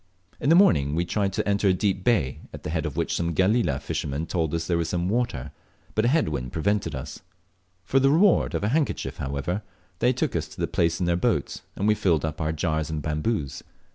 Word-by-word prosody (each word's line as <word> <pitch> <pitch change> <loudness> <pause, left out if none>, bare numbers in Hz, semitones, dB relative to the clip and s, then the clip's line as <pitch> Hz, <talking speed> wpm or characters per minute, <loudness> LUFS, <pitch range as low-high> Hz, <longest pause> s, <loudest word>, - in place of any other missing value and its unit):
In 140 - 0
the 165 - +7
morning 75 - +4
we 85 +2 0
tried 100 +2 0
to - - -1
enter 100 0 +2
a 95 - +5
deep 95 0 0
bay, 90 - +1
at - - -10
the - - -4
head 80 -1 -1
of 75 - -7
which - - 0
some 85 -1 -1
Galela 95 - +2
fishermen 70 +3 -3
told 80 -3 -1
us 85 0 -2
there 85 0 0
was 85 -1 -1
water, 90 - -1 0.4
but 110 - +1
a - - +4
head 150 - +2
wind 65 -4 -4
prevented 85 0 0
us. 65 - -7 0.7
For 135 - +3
the 135 +1 +4
reward 175 +6 +4
of - - -2
a 105 - +1
handkerchief, 145 +2 -1
however, 70 +9 -2 0.4
they 125 - +4
took 130 - -1
us 80 -2 -1
to - - -14
the - - +1
place 85 0 0
in 90 - 0
their 85 0 +2
boat, 85 - 0
and 100 - -1
we 105 - +5
filled 85 -7 +1
up 80 0 -4
our 80 0 0
jars 80 0 -1
and 80 -1 -2
bamboos. 75 - -2
85 Hz, 230 wpm, -25 LUFS, 75-105 Hz, 0.7 s, the